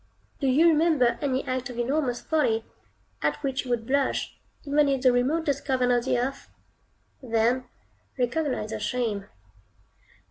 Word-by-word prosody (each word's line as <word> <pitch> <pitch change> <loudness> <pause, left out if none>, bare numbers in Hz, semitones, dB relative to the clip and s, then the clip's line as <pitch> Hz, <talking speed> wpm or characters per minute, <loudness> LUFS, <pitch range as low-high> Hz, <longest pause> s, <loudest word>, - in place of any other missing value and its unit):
Do 275 - 0
you 290 +6 +5
remember 310 -6 +3
any 265 -2 -1
act 255 0 -3
of 245 - -8
enormous 250 0 0
folly, 245 -8 +1 0.6
at - - +1
which 270 -1 -1
you - - -7
would 235 -2 -1
blush, 275 +2 0 0.3
even 290 0 +3
in 270 -1 +1
the 255 0 +4
remotest 280 +3 0
cavern 255 -3 +1
of 240 0 +2
the 260 - +1
earth? 270 +3 -3 0.7
Then 240 +1 +1 0.5
recognize 250 -3 -1
your 220 - -3
Shame. 215 -4 -2
255 Hz, 145 wpm, -26 LUFS, 240-280 Hz, 0.7 s, you